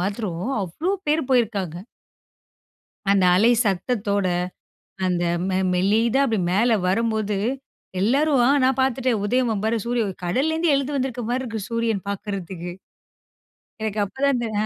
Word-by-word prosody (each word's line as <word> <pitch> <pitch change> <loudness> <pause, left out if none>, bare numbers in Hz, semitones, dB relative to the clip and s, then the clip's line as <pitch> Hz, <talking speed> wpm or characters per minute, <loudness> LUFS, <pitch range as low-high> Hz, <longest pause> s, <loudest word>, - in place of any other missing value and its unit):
மாத்திரோம் 195 +1 -3
அவ்வளோ 305 - -2 0.2
பேர் 310 +2 +2
போயிருக்காங்க. 205 -9 +1 1.4
அந்த 195 -2 +3
அலை 225 +6 +5
சத்தத்தோட, 200 0 0 0.8
அந்த 180 -1 +1 0.3
மெ 185 - 0 0.2
மெல்லிதா 220 +8 +2
அப்படி 220 -6 0
மேல 225 +4 +3
வரும்போது, 215 -1 0 0.6
எல்லாரும் 270 +5 +3
அ - - +4 0.2
நான் 265 +1 +2
பாத்துட்டேன், 255 -4 +1
உதயம் 230 -2 +1
பாரு, 225 +1 +1
சூரிய 240 -1 +1
உ - - -2 0.2
கடல்ல 270 - +1
இருந்து 325 -1 +2
எழுது 280 +1 -2
வந்திருக்க 255 -3 -2
மாரி 255 +1 0
இருக்கு, 225 -3 -4
சூரியன் 230 -4 -1
பாக்குறதுக்கு. 190 -3 -5 1.1
எனக்கு 215 -1 -2
அப்போதான் 275 +7 0
இந்த 235 - -2 0.2
அ - - -1
225 Hz, 135 wpm, -23 LUFS, 195-255 Hz, 1.4 s, அலை